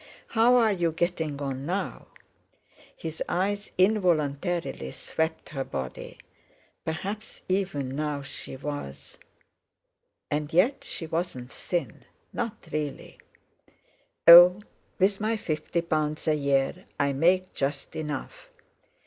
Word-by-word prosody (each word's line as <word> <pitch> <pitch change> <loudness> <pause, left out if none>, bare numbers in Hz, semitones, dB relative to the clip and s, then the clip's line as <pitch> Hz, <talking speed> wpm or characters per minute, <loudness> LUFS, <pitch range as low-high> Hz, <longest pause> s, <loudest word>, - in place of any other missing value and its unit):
How 235 +2 +5
are 230 -3 +5
you 175 -4 +1
getting 160 -3 -1
on 135 -1 -3
now?" 190 +3 -3 0.9
His - - -6
eyes 200 +2 -1
involuntarily 175 - +1
swept 160 0 -2
her 135 -3 -3
body. 65 - -6 0.7
Perhaps 195 +7 -5
even 180 -9 -1
now 150 -1 -2
she 140 - -7
was—! 140 - -7 1.1
And 150 +1 -1
yet 205 - +3
she 165 - -5
wasn't 160 -6 -3
thin—not 180 - -5
really! 150 -2 -4 1.1
"Oh! 175 +3 +11 0.4
with 195 +2 +2
my 220 +1 +1
fifty 165 -1 -2
pounds 155 -2 -1
a 155 - +4
year, 140 +5 0
I 140 -1 +2
make 185 +6 +2
just 140 0 -3
enough." 150 -3 -5
160 Hz, 105 wpm, -27 LUFS, 145-185 Hz, 1.1 s, Oh